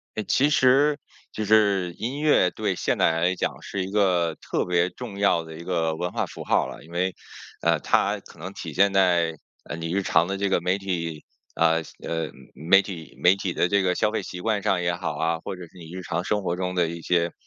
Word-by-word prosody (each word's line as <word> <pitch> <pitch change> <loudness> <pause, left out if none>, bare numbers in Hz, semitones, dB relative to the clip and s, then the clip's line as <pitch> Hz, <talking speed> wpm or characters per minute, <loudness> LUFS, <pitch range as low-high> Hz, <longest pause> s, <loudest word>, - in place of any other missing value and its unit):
呃， 110 - -2
其 140 +7 +2
实 145 +2 +4 0.3
就 110 - -3
是 100 -4 +3
音 130 +5 -3
乐 150 -12 +4
对 - - -2
现 - - 0
代 - - +4
人 80 0 -1
来 90 +2 +2
讲 - - -3
是 95 -2 -3
一 95 - -7
个 90 -5 +2
特 - - -1
别 90 0 +2
重 110 -4 -8
要 100 -4 +3
的 80 0 -10
一 85 - -9
个 80 -3 0
文 90 +2 -3
化 - - -1
符 - - -9
号 - - +2
了， - - -10
因 80 - -16
为 90 +2 0 0.5
呃， - - +2
它 - - +1
可 - - -17
能 90 +4 -6
体 80 -5 -7
现 100 +5 +4
在 90 -4 +3 0.3
呃 - - -5
你 85 0 -4
日 100 - +1
常 90 -2 +2
的 95 +1 -2
这 100 0 0
个 95 - +2
媒 90 +2 +1
体 85 -5 -3 0.3
呃， 80 0 +3 0.2
呃， 80 -1 -3 0.2
媒 85 +8 +5
体 85 -6 -9
媒 90 +2 +6
体 95 -2 -3
的 - - +2
这 100 +1 +2
个 90 -1 +2
消 105 - +1
费 110 - -2
习 90 - -7
惯 105 -1 0
上 90 -1 +1
也 85 0 0
好 80 -3 -4
啊， 80 +1 0
或 - - -5
者 90 - -10
是 85 +2 -14
你 80 -2 -11
日 95 - -5
常 85 0 -3
生 105 +2 0
活 85 - -1
中 90 0 -3
的 90 -2 +2
一 85 +1 -6
些 85 0 +1
90 Hz, 260 characters per minute, -25 LUFS, 85-100 Hz, 0.5 s, 媒